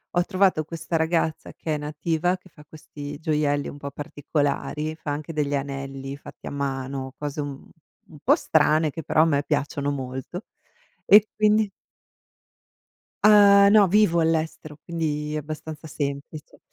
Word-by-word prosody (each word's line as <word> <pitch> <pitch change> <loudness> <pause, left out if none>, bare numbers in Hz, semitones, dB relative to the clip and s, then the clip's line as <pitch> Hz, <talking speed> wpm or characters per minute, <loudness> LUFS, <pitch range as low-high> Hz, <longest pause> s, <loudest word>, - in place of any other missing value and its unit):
ho 175 - +4
trovato 185 -5 +2
questa 165 +1 -3
ragazza 160 0 -1
che 155 -2 -3
è - - -2
nativa, 160 +4 -1
che 185 0 -20
fa 150 -2 -17
questi 145 -1 -9
gioielli 150 -2 0
un - - -9
po' 140 0 -6
particolari, 145 +2 -2
fa 155 -2 -5
anche 150 +3 -4
degli 145 -2 -1
anelli 135 0 -5
fatti - - -12
a - - -5
mano, 135 -1 -4
cose 145 0 -5
un 145 -1 -2
un - - -17 0.4
un 155 - -15
po' - - +5
strane 155 0 +2
che 165 - -6
però 155 +1 +2
a - - +6
me 145 -3 +1
piacciono 145 -1 -1
molto 130 +7 -5 0.6
e 210 +1 +7
quindi 215 -1 +2 1.5
Uhm, 200 -1 +7
no, 210 -2 +6
vivo 185 -3 +3
all'estero, 160 -2 -1
quindi 150 -3 -3
è - - -1
abbastanza 155 +1 -7
semplice. 145 +1 -6
155 Hz, 155 wpm, -24 LUFS, 145-165 Hz, 1.5 s, e